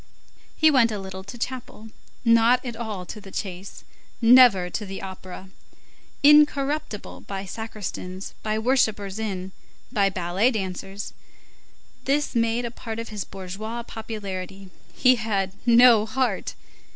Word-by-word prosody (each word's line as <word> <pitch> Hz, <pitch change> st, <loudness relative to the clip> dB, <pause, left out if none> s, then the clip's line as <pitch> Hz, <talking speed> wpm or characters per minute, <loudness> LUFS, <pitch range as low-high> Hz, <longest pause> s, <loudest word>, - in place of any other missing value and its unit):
He 315 Hz, 0 st, +5 dB
went 245 Hz, -5 st, +4 dB
a 210 Hz, -, -3 dB
little 190 Hz, -1 st, -7 dB
to 200 Hz, +4 st, -9 dB
chapel, 240 Hz, -3 st, -6 dB, 0.4 s
not 230 Hz, +2 st, +4 dB
at 240 Hz, -2 st, -4 dB
all 215 Hz, -5 st, -5 dB
to 210 Hz, -, -8 dB
the 195 Hz, -, -12 dB
chase, 190 Hz, 0 st, -6 dB, 0.4 s
never 235 Hz, -6 st, +7 dB
to 180 Hz, -, -4 dB
the 195 Hz, -1 st, -6 dB
opera. 190 Hz, 0 st, -9 dB, 0.7 s
Incorruptible 295 Hz, -5 st, +3 dB
by 195 Hz, -1 st, -5 dB
sacristans, 195 Hz, -3 st, -6 dB
by 215 Hz, 0 st, -1 dB
whippers 220 Hz, -4 st, +1 dB
in, 190 Hz, -4 st, -4 dB, 0.4 s
by 200 Hz, -5 st, +2 dB
ballet 185 Hz, +5 st, +1 dB
dancers; 195 Hz, -2 st, -5 dB, 0.9 s
this 290 Hz, +2 st, +1 dB
made 230 Hz, +1 st, +1 dB
a 235 Hz, -, -4 dB
part 225 Hz, -2 st, -7 dB
of 230 Hz, 0 st, -5 dB
his 210 Hz, -3 st, -4 dB
bourgeois 200 Hz, +5 st, -6 dB
popularity. 195 Hz, -4 st, -7 dB, 0.2 s
He 255 Hz, -1 st, +4 dB
had 200 Hz, -4 st, -1 dB
no 235 Hz, -2 st, +7 dB
heart. 255 Hz, +2 st, -1 dB
215 Hz, 130 wpm, -24 LUFS, 195-235 Hz, 0.9 s, never